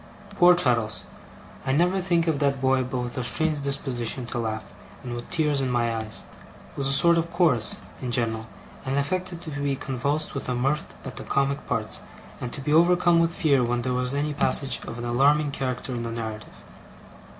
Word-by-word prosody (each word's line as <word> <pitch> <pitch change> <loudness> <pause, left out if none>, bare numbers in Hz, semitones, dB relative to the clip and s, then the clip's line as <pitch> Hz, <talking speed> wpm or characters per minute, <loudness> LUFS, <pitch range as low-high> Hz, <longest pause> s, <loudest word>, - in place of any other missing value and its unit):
Poor 180 -3 +6
Traddles 115 -9 +2 0.6
I 130 - 0
never 180 +5 +2
think 175 -2 +2
of 160 -4 0
that 140 -2 +1
boy 130 0 +2
but 125 0 -3
with 125 +1 -4
a - - -2
strange 155 +3 +2
disposition 130 -3 -1
to 120 +1 -4
laugh, 110 -1 -2 0.4
and 125 - -5
with 120 0 -7
tears 150 -4 +1
in 130 - 0
my 120 -2 +1
eyes 110 -1 -4 0.5
was 135 - -1
a - - +1
sort 170 +5 +5
of 165 +1 -2
chorus, 165 - +3 0.2
in 125 - -3
general; 115 -2 -1 0.4
and 135 +1 -1
affected 175 +4 -2
to 160 - -7
be 140 -1 -1
convulsed 140 +3 -2
with 140 - -5
mirth 135 +5 -1
at - - -7
the - - -5
comic 140 0 0
parts, - - -2 0.4
and 125 - -5
to 140 - -4
be 150 +3 0
overcome 175 +1 +5
with 165 0 +2
fear 140 -6 +2
when 120 0 0
there 130 0 -1
was 125 +2 -1
any 150 +1 -1
passage 135 -1 0
of 115 - -6
an 120 - -5
alarming 140 +5 +3
character 130 -1 -3
in 120 - -3
the 115 0 -4
narrative. 110 -2 -5
135 Hz, 195 wpm, -25 LUFS, 120-155 Hz, 0.6 s, Poor